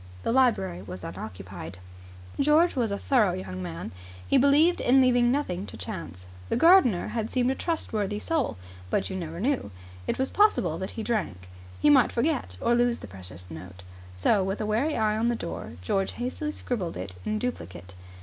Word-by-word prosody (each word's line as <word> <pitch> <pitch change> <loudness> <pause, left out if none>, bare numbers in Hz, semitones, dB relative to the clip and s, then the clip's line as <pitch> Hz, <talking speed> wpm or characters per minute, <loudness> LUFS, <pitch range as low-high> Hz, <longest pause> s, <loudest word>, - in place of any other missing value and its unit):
The - - 0
library 225 - +2
was 95 -1 -8
unoccupied. 90 -1 -8 0.6
George 305 +5 +4
was 240 -4 +1
a 200 - -2
thorough 215 -5 +2
young 95 0 -5
man. 85 -1 -6 0.4
He - - +4
believed 295 +6 +4
in 260 +2 +5
leaving 245 -2 +4
nothing 205 -9 -1
to - - -7
chance. 85 +3 -7 0.2
The - - +1
gardener 270 - +5
had 225 -1 -2
seemed 255 0 +1
a - - +1
trustworthy 215 - -2
soul, 310 - -1 0.3
but - - 0
you - - -4
never 170 -2 -5
knew. 255 - 0 0.4
It - - 0
was 265 0 -1
possible 185 - +3
that 190 - -4
he 220 - -2
drank. 190 - -2 0.3
He 145 - +5
might - - +5
forget 240 - -1
or 235 - +2
lose 240 0 +2
the - - -10
precious 90 -2 -10
note. 90 +3 -10 0.3
So, 190 - +2
with 195 +1 -2
a - - -1
wary 235 +9 0
eye 215 -1 +2
on 230 +2 +1
the 240 - +1
door, 170 -6 -6
George 195 - 0
hastily 255 +5 -3
scribbled 205 - -3
it 90 0 -5
in 215 - -1
duplicate. 95 - -5
210 Hz, 185 wpm, -27 LUFS, -, 0.6 s, in